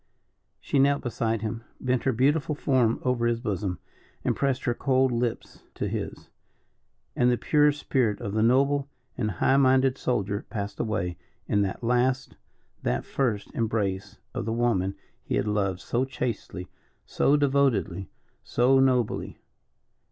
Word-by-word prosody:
She 140 - 0
knelt 140 +1 +3
beside 115 -3 -1
him, 115 +1 -4 0.2
bent 125 -1 0
her 135 - +3
beautiful 145 +5 +1
form 130 -6 +2
over 125 -2 +1
his 120 -1 0
bosom, 100 -6 -2 0.5
and - - +1
pressed 135 -1 0
her 120 - +1
cold 130 0 +2
lips 120 -1 -3
to - - -2
his, - - -5 0.8
and 125 - +3
the 120 - +2
pure 150 +2 +4
spirit 130 -7 0
of 100 - -4
the 110 - +1
noble 140 +4 +3 0.3
and 110 -4 -1
high 105 +8 +2
minded 130 0 +3
soldier 100 -5 -1
passed 105 -2 -5
away 90 -6 -2 0.3
in 105 - +2
that 100 +3 -2
last 125 +2 +1 0.5
that - - -1
first 115 -7 -1
embrace 105 -4 -2 0.2
of - - -3
the 110 - -1
woman 105 -5 +1 0.3
he - - -2
had - - 0
loved 100 -3 0
so 120 +2 0
chastely, 120 -8 -4 0.4
so 145 - +2
devotedly, 130 -10 +1 0.3
so 130 +3 +3
nobly. 125 -4 +1
120 Hz, 145 wpm, -26 LUFS, 105-135 Hz, 0.8 s, pure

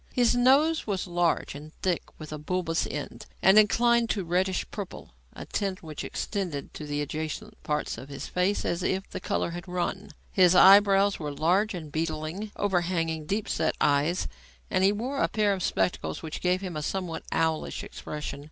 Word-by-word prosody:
His 245 -2 +4
nose 275 +6 +4
was 195 -3 -1
large 175 -2 0
and 150 +2 -10
thick 180 -3 +1 0.2
with 155 -1 -8
a 150 - -5
bulbous 165 +1 -1
end, - - -6 0.2
and 195 +3 +8
inclined 235 +2 +3
to 205 - 0
a - - -5
reddish 185 +2 0
purple, 200 - -7 0.2
a - - -8
tint 195 -3 -3
which 155 -2 -6
extended 180 -9 -4
to 150 - -7
the 145 0 -1
adjacent 155 +1 -5
parts 150 0 -2
of 135 - -10
his 140 - -6
face 185 +3 0
as 175 - -1
if 190 +2 -1
the - - -4
colour 170 - -1
had 175 +2 -7
run. 180 +3 -3 0.2
His 185 -2 +5
eyebrows 200 +1 +7
were 150 -2 -3
large 185 +8 +1
and 155 -4 -7
beetling, 160 +6 -3
overhanging 170 -5 0
deep 205 +4 -1
set 160 - 0
eyes, 150 +5 +2 0.4
and 185 0 +2
he 195 - +6
wore 250 +7 -2
a - - +3
pair 210 -2 +1
of 190 - -4
spectacles 90 - -1
which 160 - -5
gave 180 +1 +1
him 185 -4 -5
a 150 - -2
somewhat 180 +1 -3
owlish 160 -1 0
expression. 150 -2 -6
180 Hz, 185 wpm, -27 LUFS, 155-200 Hz, 0.4 s, and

